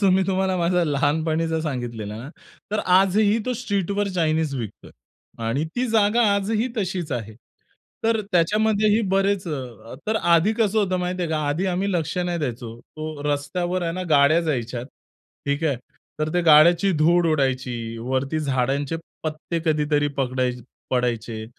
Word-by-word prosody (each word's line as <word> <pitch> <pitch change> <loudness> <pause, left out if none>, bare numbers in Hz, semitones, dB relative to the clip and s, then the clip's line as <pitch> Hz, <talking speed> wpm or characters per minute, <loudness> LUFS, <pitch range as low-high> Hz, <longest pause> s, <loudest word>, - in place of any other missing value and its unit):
जो 195 - +5
मी 190 +1 +4
तुम्हाला 190 -1 +1
माझा 175 0 +2
लहानपणीचा 160 +2 0
सांगितलेला 120 -8 -4
आहे 110 - -7
ना, 135 - -8 0.4
तर 215 - 0 0.2
आजही 205 +3 +3
तो 255 - 0
स्ट्रीटवर 200 -3 -1
चायनीज 160 -3 +1
विकतोय. 115 -6 -7 0.5
आणि 135 +7 0
ती 250 +1 +1
जागा 220 +1 +3
आजही 215 +4 0
तशीच 185 -7 -2
आहे. 110 -3 -4 0.7
तर 225 -1 +2
त्याच्यामध्येही 210 +4 +3
बरेच 195 -1 +1
अ, 125 -6 -7
तर 220 +1 +1
आधी 170 +2 +3
कसं 220 -1 +2
होतं, 185 -3 +1
माहिती 180 0 -2
आहे 170 - -2
का? 160 - 0
आधी 165 +7 0
आम्ही 190 +2 0
लक्ष 165 -2 -1
नाही 175 -1 -1
द्यायचो. 120 -5 -5
तो 155 +1 -8
रस्त्यावर 175 +6 -2
आहे 165 -1 -1
ना, 185 +2 -4
गाड्या 150 +2 +5
जायच्या. 125 -7 -2 0.6
ठीक 140 +3 0
आहे. 145 -5 +1 0.4
तर 155 0 0
त्या 175 - +2
गाड्यांची 170 +5 +6
धूळ 170 +3 +4
उडायची, 125 -5 -1
वरती 130 +5 -1
झाडांचे 135 +2 0 0.3
पत्ते 155 +2 -3
कधीतरी 150 -2 +1
पगडाय 130 -1 0 0.4
पडायचे. 115 -3 -1
160 Hz, 155 wpm, -23 LUFS, 135-190 Hz, 0.7 s, गाड्यांची